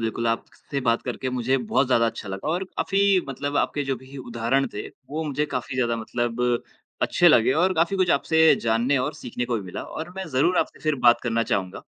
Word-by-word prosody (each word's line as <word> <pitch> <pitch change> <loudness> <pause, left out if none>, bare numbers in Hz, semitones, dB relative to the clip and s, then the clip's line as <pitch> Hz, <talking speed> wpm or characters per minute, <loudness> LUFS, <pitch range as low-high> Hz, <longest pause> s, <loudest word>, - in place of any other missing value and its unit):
बिल्कुल। 115 +1 -2
आप 115 - 0
क - - -21 0.2
से 140 -2 -1
बात 115 0 +2
करके 130 +1 -4
मुझे 125 +1 +1
बहुत 130 +2 +1
ज़्यादा 115 -2 +3
अच्छा 110 -2 -5
लगा 95 +8 -4
और 175 +4 0
काफ़ी 195 0 +2
मतलब 145 +2 -3
आपके 145 - 0
जो 130 - 0
भी 130 +3 -13
उदाहरण 120 +2 0
थे, 105 - -5
वो 150 +4 -7
मुझे 150 0 -1
काफ़ी 130 -1 -4
ज़्यादा 120 -2 +1
मतलब 120 +1 -2 0.6
अच्छे 175 - +4
लगे 130 -4 +5
और 185 0 +2
काफ़ी 170 +4 +1
कुछ 185 -2 +2
आपसे 160 +2 +4
जानने 115 +5 +2
और 145 +4 -2
सीखने 125 -4 -4
को 120 - -2
भी 105 - -4
मिला, 90 - -6
और 160 +2 -7
मैं 190 0 -4
ज़रूर 160 +7 +2
आपसे - - -2
फिर 155 -1 +1
बात 120 0 +6
करना 115 -1 0
चाहूँगा। 95 0 -2
130 Hz, 220 wpm, -24 LUFS, 115-155 Hz, 0.6 s, बात